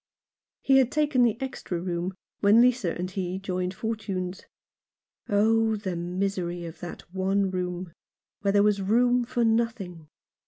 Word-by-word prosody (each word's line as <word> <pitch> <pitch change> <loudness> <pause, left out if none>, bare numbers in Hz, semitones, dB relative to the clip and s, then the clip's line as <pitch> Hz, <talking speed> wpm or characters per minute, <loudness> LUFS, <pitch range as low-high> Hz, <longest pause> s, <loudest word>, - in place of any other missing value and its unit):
He 270 -1 +5
had 255 -2 +2
taken 295 -4 +2
the 235 -2 +3
extra 265 -9 -4
room 175 +1 -3 0.2
when 205 +2 +5
Lisa 240 -7 +3
and 180 +1 -4
he 185 -1 -3
joined 185 -1 -3
fortunes. 195 -4 -4 0.8
Oh, 220 +2 +3
the 190 -4 -4
misery 175 0 -2
of 165 0 -9
that 175 - -7
one 195 +1 +1
room, 180 -2 -4 0.5
where 200 -1 +1
there 200 0 +4
was 205 -1 +2
room 245 +5 +3
for 240 0 0
nothing 225 -8 -1
195 Hz, 145 wpm, -27 LUFS, 180-225 Hz, 0.8 s, He